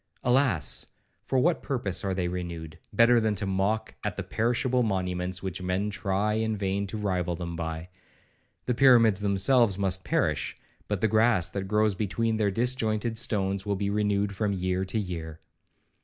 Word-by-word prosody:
—(Alas! 125 - +1 0.4
for 135 - 0
what 165 +6 +2
purpose 120 - -2
are 95 -2 -1
they 90 -2 -1
renewed, 85 -3 -6
better 115 +3 +5
than 110 -2 0
to 100 +1 -2
mock 95 +3 -1
at - - -2
the - - -4
perishable 125 +2 0
monuments 90 -3 -2
which 95 -1 -4
men 95 +3 -1
try 100 +2 -1
in 110 0 -1
vain 100 0 -1
to 110 - -5
rival 90 -4 -1
them 85 0 -5
by). 80 0 -4 0.8
The 125 - +1
pyramids 115 -6 +5
themselves 100 +2 +3
must 95 -1 0
perish, - - -1 0.3
but 105 -3 -2
the 110 - +4
grass 110 -4 +3
that 100 -1 -4
grows 105 +1 +2
between 110 +3 -1
their 105 -2 +2
disjointed 115 0 0
stones 100 -5 0
will 100 -1 -1
be 100 +1 -1
renewed 100 -1 0
from 105 0 0
year 95 0 -1
to 95 - -3
year. 85 -6 -4
100 Hz, 170 wpm, -27 LUFS, 95-110 Hz, 0.8 s, better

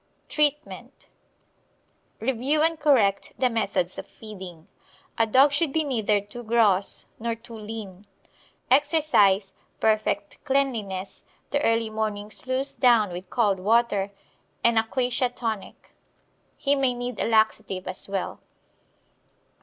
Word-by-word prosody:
Treatment 295 0 -2 1.1
Review 265 +6 +1
and 325 0 +1
correct 235 -10 +2
the 255 -1 +2
methods 200 -5 -1
of - - -8
feeding. 185 -7 -11 0.5
A 225 - +4
dog 265 +6 +5
should 290 +1 +2
be 315 +2 +1
neither 220 -7 +1
too 205 +4 -9
gross 215 -4 +2
nor 230 0 -2
too 230 +1 -13
lean. 210 -3 -8 0.6
Exercise, 265 - +3 0.3
perfect 215 -1 0
cleanliness, 225 -9 -2 0.3
the 285 - +1
early 225 -1 +1
morning 215 -1 -3
sluice 260 +4 -2
down 235 -6 +4
with 180 +1 -7
cold 205 -5 +1
water, 205 -1 +2 0.5
and 235 -1 +4
a - - +2
quassia 250 +2 0
tonic. 225 -4 -6 0.7
He 280 - +1
may 265 -3 +1
need 245 -1 -5
a - - 0
laxative 220 -4 +1
as 185 +1 -4
well. 195 -2 -3
225 Hz, 120 wpm, -25 LUFS, 205-260 Hz, 1.1 s, dog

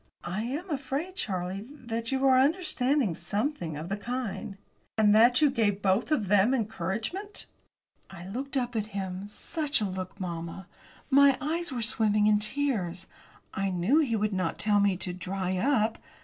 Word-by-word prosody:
"I 185 +5 -2
am 295 +10 -4
afraid, 285 +6 -3
Charlie, 190 - -3
that 230 -5 -5
you 270 0 +1
are 265 -1 +6
to 255 - +6
understand 280 - +1
something 200 - -2
of 155 +3 -6
the 200 +2 -2
kind." 225 -3 -4 0.4
"And 210 -1 +5
that 240 +6 +6
you 290 - +5
gave 205 -5 0
both 195 +9 +2
of 225 -10 +1
them 205 +6 +4
encouragement?" 220 - -3 0.6
I 175 -2 -10
looked 270 +7 -4
up 245 -2 -2
at 215 -1 -1
him 190 0 -4
such 290 +7 -1
a 215 - 0
look, 185 0 -5
mamma! 170 0 -5 0.5
My 275 0 +6
eyes 330 +3 -2
were 245 -3 -2
swimming 215 -2 +2
in 210 0 +4
tears. 210 -7 -1 0.5
I 195 0 -1
knew 185 - +2
he 260 -8 +1
would 210 -1 0
not 185 -3 -1
tell 210 -1 +3
me 200 -2 +2
to 180 0 -3
"dry 185 +1 -3
up." 225 -1 +1
215 Hz, 170 wpm, -28 LUFS, 190-270 Hz, 0.6 s, are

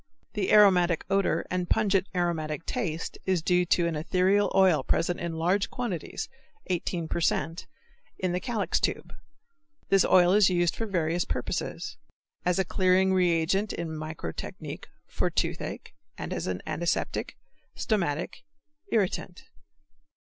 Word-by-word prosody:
The - - -1
aromatic 180 -5 +5
odor 195 0 +1
and 180 -1 -1
pungent 195 -2 +2
aromatic 165 -3 -1
taste 170 -10 -3
is 185 -4 +1
due 180 0 +2
to 175 0 +3
an 170 -1 -1
ethereal 185 +6 +2
oil 190 -5 +5
present 175 +1 0
in 170 -1 -3
large 180 +5 +1
quantities 230 -10 -4 0.4
(18 170 -1 -2
per 170 - -2
cent.) 165 +1 -1 0.5
in 185 -1 -1
the 180 - 0
calyx 230 -2 -1
tube. - - -2 0.8
This 195 -1 +5
oil 180 0 +5
is 205 -2 +6
used 175 -2 +1
for 225 - -3
various 175 -3 0
purposes; - - -4 0.5
as 180 -1 +2
a 190 - +2
clearing 185 +1 +3
reagent 180 +2 +2
in 170 -1 -4
microtechnique, 155 - -6 0.2
for - - -1
toothache, - - -3 0.2
as - - -4
an 90 -1 -3
antiseptic, 170 0 -2 0.4
stomachic, 175 -7 -1 0.5
irritant. 190 -3 -1
180 Hz, 130 wpm, -28 LUFS, 165-190 Hz, 0.8 s, is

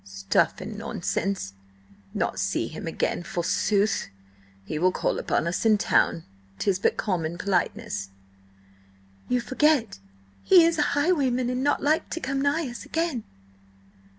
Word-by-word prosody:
"Stuff 100 0 0
and 215 -1 -6
nonsense! 200 - -2 0.6
Not - - -1
see - - 0
him - - -7
again, - - -1
forsooth! 200 +4 0 0.6
He 155 - -3
will 185 +2 +3
call - - -1
upon - - 0
us 170 - -1
in 220 -2 +5
town. 165 -4 +2 0.3
'Tis 190 - 0
but - - +1
common 170 -4 -2
politeness." 200 - -1 1.2
"You 250 - +2
forget 260 - +1 0.4
he 365 -3 +7
is 330 -1 +1
a - - +1
highwayman, 270 -6 +2
and 250 +1 -2
not 290 - +1
like 305 +2 +1
to 335 - -3
come 270 -1 -2
nigh 285 +2 +1
us 240 -1 -7
again." 325 -9 -2
230 Hz, 140 wpm, -26 LUFS, 185-285 Hz, 1.2 s, he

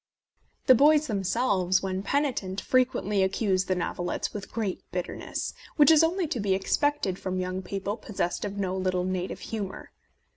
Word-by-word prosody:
The 260 - +8
boys 300 +4 +5
themselves, 195 -4 +1
when 190 0 -2
penitent, 220 -6 -1
frequently 250 -6 +1
ac 190 0 +1
cuse 190 -4 +1
the 185 - 0
novelettes 175 0 -2
with 200 -2 -7
great 215 -5 -2
bitterness, 180 0 -4 0.2
which 300 +1 +7
is 320 0 +6
only 350 +3 +1
to 255 - -2
be 200 -2 +1
expected 205 0 0
from 185 0 -3
young 185 0 -2
people 200 +3 -4
possessed 195 -5 -3
of 200 -1 -4
no 190 -2 -1
little 185 -1 0
native 185 0 -3
humour. 205 -4 -5
195 Hz, 160 wpm, -27 LUFS, 185-250 Hz, 0.2 s, The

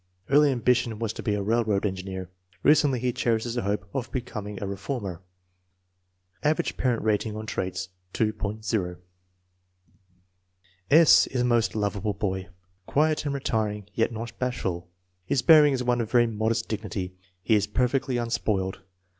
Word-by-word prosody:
*' 90 - -36
Early 145 0 +6
ambition 120 -2 +1
was 115 -1 -2
to - - -7
be 105 -4 0
a 100 - -2
railroad 110 -2 +1
engineer. 95 -1 -4 0.3
Recently 145 -4 +4
he 125 0 0
cherishes 115 0 0
the 120 - -1
hope 100 -2 -2
of 130 -3 -3
becoming 105 -6 -5
a - - -4
reformer! 100 -2 -4 1.2
Average 150 +1 0
parent 125 -3 0
rating 105 0 0
on 110 0 -5
traits, 95 -3 -3 0.3
2.00. 105 -3 -1 1.9
S. 160 +1 +7
is 125 - -1
a - - +2
most 120 -3 +2
lovable 105 0 -1
boy, 95 -2 -3 0.4
quiet 155 +1 +1
and 140 -1 -1
retiring 105 -6 -2
yet 115 +2 +1
not 115 +1 -6
bashful. 95 -9 -2 0.3
His 120 +8 0
bearing 150 -3 +7
is 125 -1 -1
one 120 -1 +1
of 110 - -4
very 120 0 +4
modest 110 0 -1
dignity. 100 -4 -4 0.3
He 115 - +2
is 105 -1 +3
perfectly 125 +3 0
unspoiled. 105 -5 -1
110 Hz, 150 wpm, -26 LUFS, 100-125 Hz, 1.9 s, S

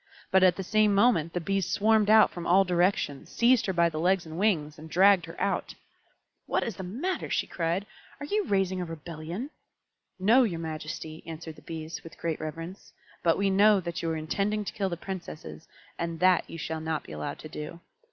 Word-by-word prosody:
But 190 - +5
at 185 -1 +5
the 190 - -4
same 210 +1 +3
moment 195 -7 +3
the 175 - 0
Bees 195 +2 -1
swarmed 215 0 +3
out 220 0 +7
from 175 -1 -6
all 190 +3 +6
directions, 175 -5 0
seized 240 -1 +3
her - - +1
by 170 -1 +4
the 155 -2 -4
legs 180 +1 +2
and 160 0 -8
wings, 155 -7 +1
and 160 +1 -10
dragged 190 +2 +5
her - - -10
out. - - -1 0.7
"What - - +1
is 225 -6 -4
the - - -5
matter?" 265 - -3
she - - 0
cried. 170 +3 -2 0.3
"Are 285 - -5
you 415 +6 0
raising 190 - 0
a - - -2
rebellion?" 165 - -6 0.7
"No, 225 +8 +5
your 205 -9 0
majesty," 155 0 -6
answered 160 -1 -7
the - - -14
Bees, 160 0 -7
with 165 - -12
great 165 -2 -2
reverence; 165 +5 -7 0.3
"but 165 -1 +3
we 195 0 +1
know 205 +1 +5
that 170 -2 -4
you 165 - -1
are 160 - -1
intending 200 +7 -1
to - - -5
kill 195 -2 -1
the 170 - -4
Princesses, 170 -3 -8 0.3
and 170 -1 -3
that 185 -1 +3
you - - -7
shall 160 0 -4
not 160 -1 -2
be - - -12
allowed 75 -1 -5
to - - -9
do. 150 +3 -7
175 Hz, 210 wpm, -28 LUFS, 160-200 Hz, 0.7 s, out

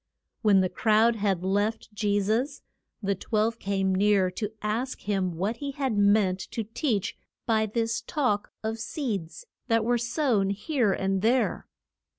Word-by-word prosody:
When 200 -3 +5
the 185 - +2
crowd 225 +3 +3
had 195 -4 0
left 205 +3 -1
Je 205 -1 +1
sus, 230 +8 -1 0.4
the 200 0 +1
twelve 220 +3 -1
came 195 -1 0
near 195 -1 +3
to 210 +3 -4
ask 230 +5 -2
him 190 -3 -1
what 205 +6 -1
he 280 +1 -4
had 265 -5 -1
meant 200 -2 +3
to 225 - -4
teach 220 - -1 0.3
by 220 -2 +2
this 230 +2 -1
talk 250 -9 -1
of 220 +1 -2
seeds 225 - -4 0.2
that 225 -2 +2
were 240 0 +2
sown 235 -4 +1
here 215 +2 0
and 195 0 0
there. 240 +4 +1
215 Hz, 155 wpm, -27 LUFS, 200-235 Hz, 0.4 s, When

